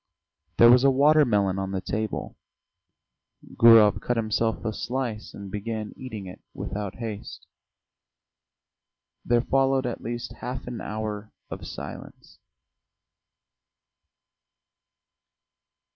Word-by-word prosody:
There 120 0 +8
was 125 +1 +6
a 140 - +6
water 145 +3 +5
melon 100 -5 +1
on 95 0 -3
the 95 - -1
table. 110 +3 -4 1.2
Gurov 115 -3 +7
cut 120 - -1
himself 110 +1 -1
a 110 - -1
slice 120 -2 -4
and 100 -1 -9
began 105 +1 -4
eating 110 -6 -7
it 90 - -10
without 100 -1 -5
haste. 110 -3 -7 1.8
There 120 0 +2
followed 135 +1 +1
at 120 - -4
least 120 +1 -5
half 125 0 -5
an 125 -1 -6
hour 105 -1 -5 0.2
of - - -7
silence. - - -10
115 Hz, 105 wpm, -25 LUFS, 105-125 Hz, 1.8 s, There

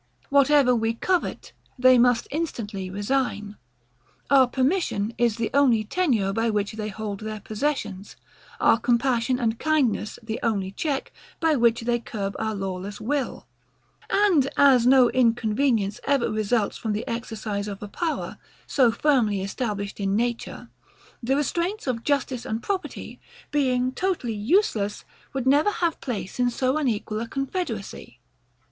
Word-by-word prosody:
Whatever 280 -2 +5
we 225 0 0
covet, 365 +8 -2 0.2
they 255 0 +6
must 245 -1 +3
instantly 225 - -4
resign: 205 0 -2 0.8
Our 265 -2 +6
permission 255 - 0
is 235 -3 +2
the 230 -1 -2
only 255 -6 +4
tenure, 220 - 0
by 225 +2 +1
which 210 -1 -1
they 215 -1 -5
hold 210 -1 -5
their 215 0 -5
possessions: 210 -3 -3 0.4
Our 225 - +4
compassion 245 +1 +1
and 230 -2 -1
kindness 275 -9 0
the 225 0 -4
only 200 -5 -1
check, 275 +6 -3 0.3
by 320 -2 +3
which 235 -2 +3
they 240 +1 0
curb 200 -4 -5
our 220 -1 -2
lawless 195 +1 -5
will: 275 +3 -2 0.6
And 360 -10 +3
as 260 -4 +5
no 255 -2 +6
inconvenience 230 -3 +1
ever 275 -5 +1
results 215 0 0
from 220 -2 -2
the 210 - -4
exercise 215 -3 -4
of 200 0 -6
a - - -5
power, 320 - -3 0.3
so 255 -5 +3
firmly 225 -8 +2
established 200 -1 -4
in 195 0 0
nature, 235 +1 -3 0.5
the 260 +3 +1
restraints 340 +8 -1
of 240 -4 -2
justice 270 -4 -1
and 220 +2 -4
property, 390 -2 -4 0.3
being 255 -3 +1
totally 345 -8 -2
USELESS, 215 - 0 0.3
would 265 -2 -2
never 290 +8 +4
have 340 -5 -1
place 210 -5 -5
in 245 0 +3
so 255 +2 0
unequal 220 -6 -1
a 230 - -4
confederacy. 260 - -5
235 Hz, 140 wpm, -25 LUFS, 210-275 Hz, 0.8 s, they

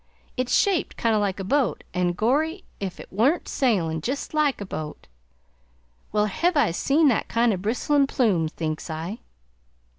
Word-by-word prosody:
It's 255 -1 +1
shaped 390 -5 +1
kind 230 -2 +2
o' - - +3
like 200 -2 -1
a - - -3
boat, 265 +4 0
an' 180 -1 +1
gorry, 305 - 0 0.2
ef 190 -2 -4
it - - -11
wa'nt 265 - +2
sailin' 170 - 0
jest 270 - -3
like 300 -3 +2
a 200 - -5
boat! 155 -5 -6 1.0
Where 210 0 +2
hev 335 - 0
I 285 - +3
seen 290 - +3
that 235 - 0
kind 230 -1 +2
of 185 - -3
a - - -9
bristlin' 275 +7 +2
plume?' 200 -13 +1
thinks 155 +1 -4
I." 165 +8 -5
220 Hz, 175 wpm, -24 LUFS, 180-280 Hz, 1.0 s, o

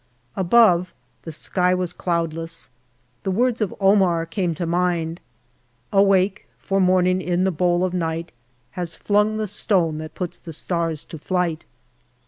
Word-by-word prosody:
Above, 185 -2 +4 0.3
the 165 - -5
sky 180 +3 +1
was 180 -1 -2
cloudless. 165 -3 -3 0.5
The - - -3
words 235 +4 +1
of 210 - -1
Omar 190 -4 +3
came 170 -1 -2
to 170 - -3
mind 170 -1 -1 0.7
Awake, 195 -1 +3
for 195 0 0
Morning 185 0 +3
in 180 0 0
the 190 - +2
bowl 175 +1 +1
of 185 - -3
Night 165 -1 -2 0.4
Has 175 -2 -4
flung 210 +1 +1
the 215 - -1
Stone 180 -6 0
that 155 0 -8
puts 180 -2 -5
the 165 - -9
Stars 165 -1 -1
to 160 - -9
flight. 175 -1 -1
180 Hz, 145 wpm, -22 LUFS, 165-190 Hz, 0.7 s, Above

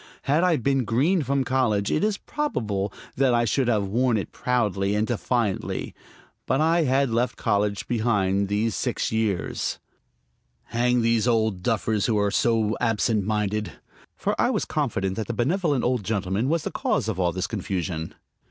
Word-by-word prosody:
Had 150 +5 +2
I 180 -3 +3
been 135 +1 +1
green 145 - +2
from 140 -1 0
college 120 -6 +1
it 155 - +1
is 210 -1 +1
probable 105 - -2 0.3
that 130 -2 +3
I 120 0 +2
should 130 +2 +1
have 105 -4 +2
worn 120 +4 +1
it 100 - -4
proudly 105 -5 0
and 105 +1 +1
defiantly. 115 -3 -1 0.5
But 130 +2 +1
I 165 +1 +3
had 135 -1 +2
left 120 +2 0
college 100 0 0
behind 100 -4 +1
these 105 +2 0
six - - -1
years. 110 -5 -1 0.9
Hang 120 +1 +1
these 115 0 +2
old 110 -5 +1
duffers 110 -1 0
who 110 -3 +1
are 100 -1 +1
so 110 -1 +2
absent 110 -2 +1
minded! 105 0 -1 0.4
For - - -1
I - - +3
was - - 0
confident 95 0 -1
that 110 - -3
the 115 - -3
benevolent 145 - +1
old 125 -3 0
gentleman 100 +3 -1
was 165 0 +1
the - - -3
cause - - -1
of 105 -4 -2
all 90 -1 +2
this 95 +2 -2
confusion. 90 -5 -3
115 Hz, 170 wpm, -25 LUFS, 100-125 Hz, 0.9 s, I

